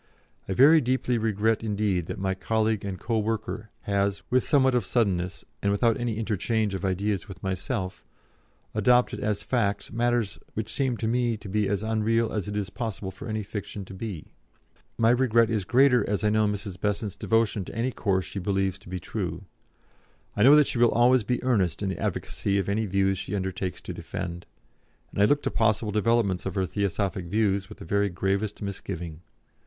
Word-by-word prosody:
I - - +1
very 155 - +7
deeply 125 -1 0
regret 110 0 +1
indeed 100 -5 0
that - - -5
my 95 0 0
colleague 110 +2 0
and 95 -3 -4
co 115 0 0
worker 110 0 -3
has, 100 -1 0
with 130 0 +4
somewhat 130 -3 +3
of 125 - +2
suddenness, 95 -7 0 0.2
and 100 - +1
without 115 +3 +3
any 120 -3 -2
interchange 110 -1 0
of 95 - -4
ideas 95 +1 -1
with 95 -3 -11
myself, 95 +1 -3 0.7
adopted 125 +4 +3
as 105 -2 -1
facts 100 -5 -1
matters 120 -2 0 0.2
which 110 0 -3
seem 130 -4 0
to 110 - -2
me 120 -1 +1
to 105 - -11
be 105 +1 0
as 100 +1 -1
unreal 110 +1 +1
as 105 -2 -2
it 105 0 -3
is 100 -1 -2
possible 105 -5 -4
for 95 - -9
any 110 -1 -2
fiction 100 0 -6
to 95 - -11
be. 95 -5 -6 0.7
My 115 0 +4
regret 120 -2 +3
is 105 -4 0
greater 125 -1 +5
as 105 0 -1
I 105 - +3
know 110 0 +3
Mrs. 100 -2 -4
Besant's 105 0 -1
devotion 115 -3 +1
to - - -9
any 120 +3 0
course 95 -5 0
she 100 - -5
believes 95 0 0
to 95 - -14
be 90 0 -3
true. - - -4 0.9
I - - -1
know 135 +6 +8
that 150 -1 +6
she 120 - -2
will 120 -1 +6
always 120 +1 +4
be 125 +3 -1
earnest 100 - +1
in 100 - 0
the 95 - -4
advocacy 100 0 -1
of 95 - 0
any 105 +2 0
views 95 0 +1
she 105 - -4
undertakes 95 -1 -3
to - - -6
defend, 85 0 -6 0.6
and - - -1
I - - +7
look 145 +6 +2
to - - -1
possible 110 -1 +1
developments 105 -3 +1
of 95 - -4
her 95 -1 +1
Theosophic 100 -1 -1
views 100 0 0
with - - -11
the - - -10
very 100 +3 +1
gravest 100 +4 -2
misgiving. 90 -5 -5
105 Hz, 195 wpm, -26 LUFS, 95-115 Hz, 0.9 s, know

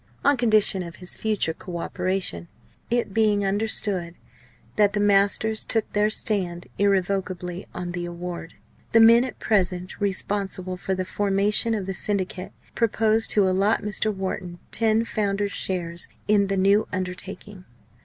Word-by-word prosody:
On 285 - +5
condition 215 -5 +4
of 170 -2 -7
his 180 -1 -5
future 210 -7 -1
co 175 +1 -7
operation 180 - -2 0.4
it 235 -4 0
being 210 -2 +2
understood 195 -3 0 0.6
that 205 -1 +3
the 210 - 0
masters 205 +2 +3
took 225 -2 -1
their 210 +1 +3
stand 185 -5 -1
irrevocably 190 -2 -1
on 180 -1 -4
the 175 -1 -4
award 175 -1 -7 0.4
the 225 - +7
men 230 +2 +7
at 255 - -6
present 185 -3 -1
responsible 195 -1 -1
for 190 +1 -3
the 185 0 -3
formation 205 +3 +1
of 200 -3 -3
the 195 - -3
Syndicate 190 -1 -2 0.2
proposed 225 -1 +1
to 200 -3 +3
allot 195 +4 +2
Mr. 210 +1 -1
Wharton 190 -3 -4
ten 225 0 +2
Founder's 205 -2 -1
Shares 175 -3 -3 0.2
in 205 -1 +3
the 195 0 -1
new 200 +3 +3
undertaking. 185 +1 -5
195 Hz, 145 wpm, -24 LUFS, 185-210 Hz, 0.6 s, the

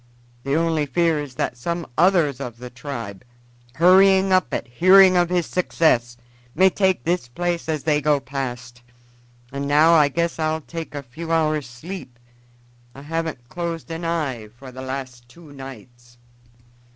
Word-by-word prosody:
The 140 +3 -1
only 160 -2 +1
fear 165 0 +1
is 145 -3 -7
that 125 - -2
some 170 +7 -3
others 165 -5 +3
of 125 -4 -6
the 125 +1 -9
tribe, 120 -6 -7 0.5
hurrying 190 +3 +5
up 185 0 +2
at - - -3
hearing 185 +9 +6
of 175 -1 +3
his 175 -2 +1
success, 120 -9 +1 0.4
may 190 0 +5
take 190 -9 +1
this 175 -6 -1
place 170 +5 -3
as 155 -3 -2
they 150 0 +1
go 145 0 +2
past. 125 -3 -6 0.7
And 140 +1 -4
now 155 +3 +5
I 150 -3 +6
guess 170 +4 -2
I'll 155 0 -1
take 165 0 -8
a 140 - -5
few 160 +7 -8
hours' 155 -4 0
sleep. 130 0 -9 0.8
I 135 - -11
haven't 160 -5 -4
closed 170 +1 -5
an 165 +1 -5
eye 150 -10 -2
for 130 0 -11
the 130 +1 -9
last 130 -2 -7
two 160 +2 -16
nights." 120 -2 -12
150 Hz, 160 wpm, -22 LUFS, 130-170 Hz, 0.8 s, hearing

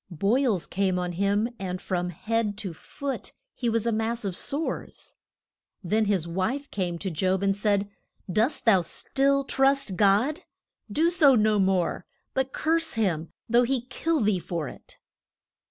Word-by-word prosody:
Boils 200 - +1
came 190 -1 0
on 180 0 -2
him 200 +5 +1
and 185 -1 -3
from 180 -1 -2
head 215 +4 -1
to 195 -5 -5
foot 275 - -6 0.2
he 240 - -1
was 230 -1 0
a 235 - +2
mass 225 +1 -1
of 190 -3 -2
sores. 295 - -4 0.7
Then 215 +5 +1
his 190 -5 0
wife 225 +12 -2
came 180 -3 -2
to 190 +2 -4
Job 185 +4 0
and 195 0 +2
said, 205 -1 +1 0.4
Dost 225 - 0
thou 200 -6 +6
still 275 +10 +1
trust 270 -5 +2
God? 210 - +3 0.5
Do 330 +9 +2
so 300 -7 +6
no 215 -2 +3
more, 190 -2 +1 0.3
but 265 0 0
curse 330 +1 0
him, 175 -8 -1 0.2
though 235 +1 +4
he 250 +1 +1
kill 325 +4 0
thee 205 -3 +2
for 165 -3 -4
it. - - -12
210 Hz, 155 wpm, -26 LUFS, 185-255 Hz, 0.7 s, thou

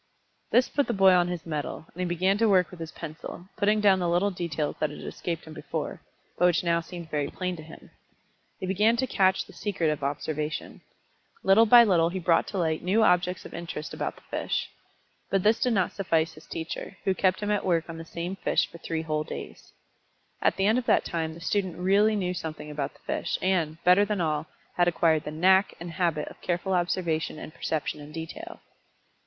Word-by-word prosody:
This 250 - +4
put 285 -1 0
the 235 - 0
boy 195 -1 +6
on 175 -1 +4
his 175 -2 -4
mettle, 155 -1 -4
and 180 - -14
he 180 - 0
began 185 +3 +2
to 225 -1 +4
work 185 -4 +3
with 180 - -11
his 165 -1 -6
pencil, 165 +2 -8
putting 210 +1 +2
down 200 -2 +5
little 175 +3 +2
details 165 -5 -2
that 155 - +1
had 150 - -9
escaped 170 -2 -5
him 160 - -10
before, - - -5 0.4
but 180 - +5
which 175 0 +2
now 170 -1 +2
seemed 170 -1 -9
very 145 -2 0
plain 180 -1 -3
to - - -8
him. 160 +1 -13 0.7
He - - -3
began 210 +5 +3
to 260 - +1
catch 190 -5 +2
the - - -15
secret 185 -6 -1
of 150 -2 -4
observation. 150 +2 -3 0.6
Little 215 +4 +6
by 240 +2 +9
little 170 -6 +3
he 185 - -4
brought 170 -2 +2
to 200 - -5
light 160 -3 0
new 200 +5 +2
objects 180 -2 +2
of - - -10
interest 165 -2 -6
about - - -3
the - - -19
fish. - - -2 0.6
But 195 -2 +1
this 220 +2 +4
did 250 - +2
not 190 -4 +1
suffice 165 -4 0
his 155 - -15
teacher, 165 +4 -6
who 190 - +2
kept 185 0 +1
him 210 0 -1
at 205 - +1
work 170 -3 +1
on 165 -1 -7
the 165 - -7
same 175 +4 -5
fish - - +1
for 170 - -11
three 165 -1 -3
whole 155 -1 -1
days. - - -9 0.7
At - - +3
the 195 - +2
end 220 +4 +4
of 245 - -7
that - - +4
time 160 -1 -2
the - - -11
student 185 -1 -1
really 200 +4 +3
knew 180 -3 -1
something 155 -3 -6
about 145 -2 -3
the - - -23
fish, - - -2
and, 170 -5 0
better 180 +3 +6
than 205 -1 -1
all, 155 -2 -1 0.3
had 175 0 +4
acquired 165 -2 +2
the 150 - -4
"knack" 190 +5 +4
and 170 0 -6
habit 165 -3 0
of - - -15
careful 180 +2 -1
observation 175 -3 0
and 155 - -9
perception 155 -1 -2
in 145 +1 -10
detail. 175 - -8
175 Hz, 215 wpm, -27 LUFS, 160-195 Hz, 0.7 s, by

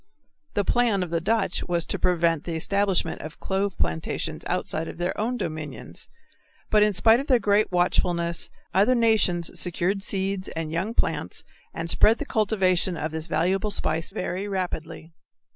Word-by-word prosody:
The 205 - +1
plan 230 -5 +2
of 175 - -6
the 170 -1 0
Dutch 200 0 0
was 170 -2 +1
to - - -3
prevent 170 -3 +2
the 170 - -3
establishment 195 0 0
of 155 +2 -9
clove 195 0 -1
plantations 80 0 -2
outside 160 +1 -1
of - - -8
their 175 +2 -1
own 235 +4 -1
dominions, 155 - -6 0.6
but 215 - +5
in 210 0 +5
spite 225 +6 +5
of 275 - -5
their 255 - +5
great 205 -2 +2
watchfulness 175 -1 +1 0.2
other 205 +8 +4
nations 215 -7 +2
secured 180 +3 0
seeds 195 -1 -1
and 160 -1 -3
young 190 +8 -2
plants - - -1 0.3
and 165 - -4
spread 215 +6 +5
the 295 - -4
cultivation 190 - +1
of 155 +1 -3
this 160 +1 -5
valuable 190 +6 +1
spice 165 -5 0
very 195 -1 -3
rapidly. 170 -4 -4
185 Hz, 160 wpm, -25 LUFS, 165-205 Hz, 0.6 s, but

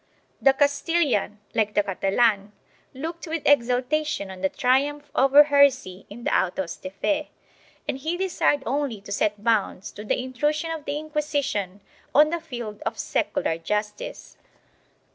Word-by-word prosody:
The 270 - +6
Castilian, 285 - +1 0.2
like 215 -1 0
the 205 - +4
Catalan, 200 +1 +1 0.4
looked 330 +5 -6
with 320 -1 -3
exultation 255 -3 +1
on 185 -1 -10
the 190 - +2
triumph 285 +3 0
over 275 +3 +7
heresy 280 -10 +2
in 235 +4 -10
the - - +1
autos 185 -1 -1
de 185 - -7
f 195 - -29
e, 300 0 0 0.6
and 265 - -2
he 320 +5 -2
desired 355 -6 +1
only 275 -6 -1
to 200 - -11
set 210 0 0
bounds 210 -4 0
to 210 - -9
the 215 - 0
intrusion 295 +6 -1
of 320 -3 -5
the 285 +1 -2
Inquisition 290 - -2 0.3
on 300 +2 +6
the 340 -1 -2
field 240 -9 -7
of - - -3
secular 165 - -1
justice. 210 +4 -4
260 Hz, 150 wpm, -24 LUFS, 210-295 Hz, 0.6 s, over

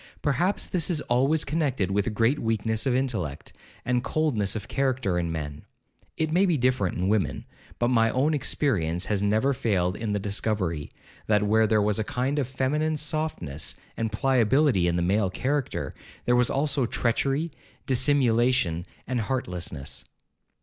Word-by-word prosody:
Perhaps 175 +8 +1
this 175 -2 -1
is 170 -4 +1
always 135 +6 +2
connected 135 - 0
with 100 +3 0
great 115 +7 +2
weakness 110 +1 0
of 125 - +2
intellect, 110 - -2 0.3
and 125 0 +1
coldness 125 -12 0
of 105 -2 -5
character 130 -9 0
in 85 -1 -2
men. 75 -3 -5 0.6
(It 160 -1 0
may 190 +3 +4
be 170 -4 +2
different 125 -7 +1
in 90 +1 0
women—but 105 - -2
my 115 -2 +3
own 140 +6 +1
experience 95 - 0
has 105 -2 0
never 110 +7 +2
failed 95 -8 0
in 110 -2 -3
the 105 - +1
discovery, 100 -6 -1 0.4
that 105 -1 +3
where 110 +1 +3
there 105 -1 +3
was 105 0 +1
a - - +1
kind 130 +6 -1
of 135 - -1
feminine 150 +4 0
softness 150 - -2 0.2
and 115 -1 -2
pliability 125 - +3
in 85 - +1
the 85 - +1
male 95 +2 +2
character, 135 +7 -2 0.3
there 120 - +3
was 125 -1 +3
also 140 -2 +1
treachery, 135 +8 0 0.3
dissimulation, 125 - +2 0.2
and 125 -2 -1
heartlessness.) 90 - -3
120 Hz, 155 wpm, -26 LUFS, 100-135 Hz, 0.6 s, may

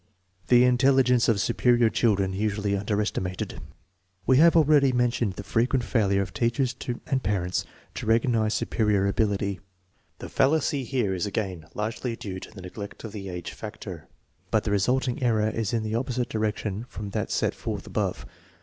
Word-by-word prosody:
The 125 0 +6
intelligence 125 -1 +4
of 110 -3 +2
superior 120 +3 +3
children 100 -5 +1
usually 105 0 -1
underesti 105 +1 0
mated. 90 0 -4 0.7
Wo - - +4
have 165 +6 +6
already 150 -4 +5
mentioned 120 -4 +1
the 100 - -7
frequent 120 +4 +1
failure 100 -5 +2
of 90 -2 -9
teachers 120 +6 0 0.3
and 135 -2 0
parents 90 -4 -1 0.3
to - - -6
recognize 115 -1 +2
superior 105 -3 +1
ability. 100 -1 0
1 - - -25 0.6
The - - -8
fal 135 -1 +3
lacy 145 -3 0
here 120 -7 0
is 90 +1 -1
again 95 -6 -3
largely 110 +3 -3
due 95 -4 -6
to - - -10
the 95 -4 -11
neglect 100 +3 -8
of 110 - -6
the 100 -2 -6
age 90 -2 -5
factor, - - -8 0.4
but 110 0 +2
the 105 - -2
resulting 125 +6 +1
error 110 -3 +2
is 110 -2 -2
in 115 -2 0
the 110 0 -3
opposite 125 +1 -1
direction 105 -1 -2
from 105 -3 -7
that - - -2
set - - 0
forth - - -5
above. - - -2
110 Hz, 170 wpm, -26 LUFS, 100-125 Hz, 0.7 s, The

